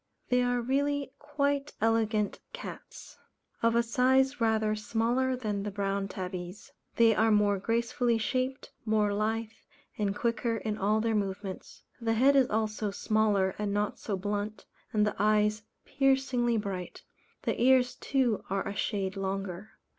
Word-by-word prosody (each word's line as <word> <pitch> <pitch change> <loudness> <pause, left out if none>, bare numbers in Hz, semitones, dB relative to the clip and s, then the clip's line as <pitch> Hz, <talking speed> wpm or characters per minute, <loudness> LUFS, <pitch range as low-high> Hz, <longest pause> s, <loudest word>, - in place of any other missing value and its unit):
They 250 0 +3
are 245 0 +1
really 280 +2 0
quite 285 -1 -1
elegant 220 -1 +1
cats. - - -9 0.4
Of 230 0 +3
a 235 - +4
size 260 +3 +2
rather 220 -1 +2
smaller 235 +4 0
than 210 -5 -3
the 210 - -3
Brown 200 0 -2
Tabbies. 185 0 -6 0.2
They 230 -1 +5
are 220 +2 +3
more 205 -2 +3
gracefully 235 +2 +1
shaped, 255 +4 -2
more 215 -2 +1
lithe 220 +2 -1 0.5
and 200 -1 0
quicker 230 0 0
in 215 -1 -3
all 210 +3 +2
their 225 0 0
movements. 195 -2 -4 0.2
The 225 -1 +1
head 265 +5 +4
is 265 -2 +4
also 215 -1 -1
smaller 205 -2 +1
and 205 -1 -1
not 205 0 -1
so 200 -3 -3
blunt, 205 +2 -3 0.3
and 210 -1 +2
the 210 - -1
eyes 210 +1 +2 0.2
piercingly 265 -3 +2
bright; 195 -4 -5 0.4
the - - -1
ears 250 0 +4
too 255 -6 0
are 195 +1 -1
a 200 - -4
shade 195 -2 -2
longer. 195 0 -4
220 Hz, 145 wpm, -29 LUFS, 205-245 Hz, 0.5 s, They